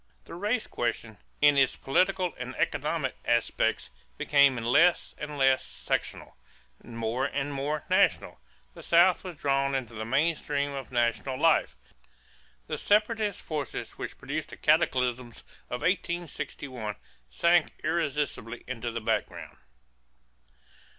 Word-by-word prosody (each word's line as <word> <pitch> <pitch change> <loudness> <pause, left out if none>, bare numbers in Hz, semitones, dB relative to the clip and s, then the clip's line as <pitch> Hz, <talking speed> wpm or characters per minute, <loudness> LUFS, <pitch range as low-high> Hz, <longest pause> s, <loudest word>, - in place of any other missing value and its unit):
The - - -12
race 210 +7 -1
question, 115 -2 -3 0.2
in 145 -1 +6
its 135 -2 +3
political 185 +5 +1
and 125 +1 -6
economic 150 -2 -1
aspects, 120 -1 0 0.3
became 140 -3 +4
less 145 +10 +3
and 150 -1 -6
less 135 -1 +3
sectional, - - -4 0.5
more 115 +2 -2
and 140 +1 -2
more 145 +2 -2
national. - - +2 0.3
The - - -11
South 175 +2 +4
was 180 -3 -7
drawn 140 -1 +1
into 125 -4 -3
the 110 0 -5
main 140 +8 +2
stream 145 -1 -2
of 135 -2 -7
national 120 +2 0
life. 150 - +3 0.9
The - - -4
separatist 210 -1 +1
forces 150 -4 -4
which - - -6
produced - - -4
the - - -10
cataclysm 125 -2 +1 0.4
of 125 - -4
1861 155 - -3 0.3
sank 170 - +3 0.2
irresistibly 150 -7 -2
into 120 -1 -4
the 115 0 -4
background. - - -2
140 Hz, 125 wpm, -28 LUFS, 125-165 Hz, 0.9 s, in